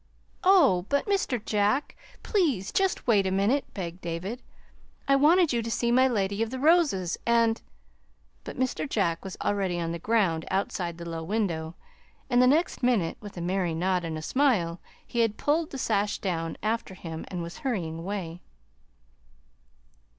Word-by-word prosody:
"Oh, 280 - +5
but 280 0 +1
Mr. 390 - 0
Jack, 210 +6 +1 0.3
please 285 - +1
just 385 -1 0
wait 205 -5 +3
a - - -1
minute," 205 +9 +1
begged 180 -2 -5
David. 175 +8 -4 0.7
"I 275 - +5
wanted 315 +2 +4
you 235 - +1
to 230 - -4
see 235 +1 0
my 260 +2 +5
Lady 200 -3 -1
of 225 - 0
the 260 - -5
Roses, 285 - +2
and 230 -1 +2 0.4
" - - -38
But - - -8
Mr. 260 +3 -1
Jack 170 -8 0
was 190 -1 -7
already 190 -4 0
on 165 -1 -2
the 170 - -4
ground 185 -6 +1
outside 175 -3 -2
the 170 0 -7
low 165 -1 -4
window, 170 -4 -2 0.6
and 245 0 +5
the 250 - +6
next 310 +7 +2
minute, 235 -10 +1
with 205 -3 -10
a - - -4
merry 180 -1 -1
nod 180 +1 0
and 160 -1 -4
smile, 210 -12 +1 0.3
he 240 - -4
had 225 -2 +2
pulled 310 +2 +1
the 270 - -6
sash 210 -4 0
down 165 -4 -3
after 215 -3 -2
him 165 -3 -7
and 175 -2 -4
was 170 +1 -8
hurrying 175 -11 -2
away. 175 -2 -5
205 Hz, 170 wpm, -27 LUFS, 175-250 Hz, 0.7 s, the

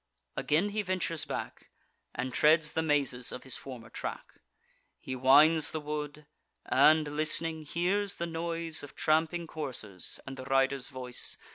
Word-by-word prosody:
Again 165 +8 +1
he 210 +1 -1
ventures 180 -5 -1
back, - - -6 0.5
And 125 +1 -3
treads 155 0 +4
the 160 - 0
mazes 140 -6 +1
of 125 - -7
his 130 - -4
former 120 -4 -9
track. - - -7 0.6
He 130 - -5
winds 145 +5 +6
the 160 - -3
wood, 150 0 -5 0.4
and, 155 0 +5
list'ning, 155 +2 0
hears 195 +5 0
the 170 - -3
noise 165 -1 -3
Of 145 - -11
tramping 160 +2 +1
coursers, 130 - -4
and 135 -1 -7
the 130 - -7
riders' 135 -1 +2
voice. 125 -2 -3
150 Hz, 145 wpm, -30 LUFS, 135-165 Hz, 0.6 s, winds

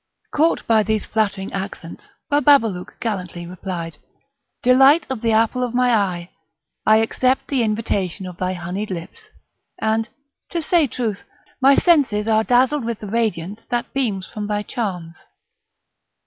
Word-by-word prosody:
Caught 320 +3 +1
by 225 -1 +4
these 215 0 -1
flattering 205 -3 -1
accents, 190 -3 -7 0.2
Bababalouk 270 -10 +3
gallantly 180 -6 -4
replied: 175 -2 -6 0.6
"Delight 270 +5 +6
of 250 -4 -3
the 230 -1 +1
apple 225 +3 +2
of 245 -1 -2
my 250 0 +3
eye! 185 -5 0 0.6
I 215 - +7
accept 255 +4 +1
the 270 -3 +1
invitation 210 -4 -1
of 180 -1 -8
thy 185 0 -1
honeyed 185 +4 -4
lips; 190 - -8 0.5
and, 220 0 0 0.4
to 340 - -2
say 330 -1 +2
truth, 225 -4 -3 0.4
my 275 +1 +6
senses 270 - +3
are 220 0 +3
dazzled 255 +4 +2
with 230 -1 -3
the 210 - -7
radiance 215 -3 -2
that 240 -1 -3
beams 215 -9 -1
from 210 0 -6
thy 210 0 -1
charms." 180 -8 -5
220 Hz, 145 wpm, -21 LUFS, 190-250 Hz, 0.6 s, I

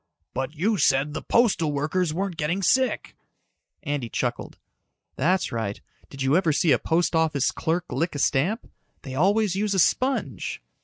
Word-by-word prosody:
"But 130 +4 -3
you 200 +6 0
said 135 +2 +2
that 155 - -6
postal 200 -10 +3
workers 155 +4 0
weren't 185 +2 -2
getting 165 +5 -1
sick." 260 +7 +1 0.7
Andy 145 -7 -3
chucked. - - -3 0.6
"That's 180 +7 +1
right. 110 -3 -3 0.3
Did 135 -1 -5
you 135 +3 +3
ever 175 -3 +3
see 150 +2 +2
a - - +4
post 165 +1 +1
office 155 -4 +2
clerk 170 +1 -1
lick 165 +4 -1
a - - -2
stamp? 165 - 0 0.4
They 130 - -7
always 195 +6 +2
use 200 0 0
a - - +2
sponge." 220 - 0
160 Hz, 160 wpm, -25 LUFS, 145-190 Hz, 0.7 s, a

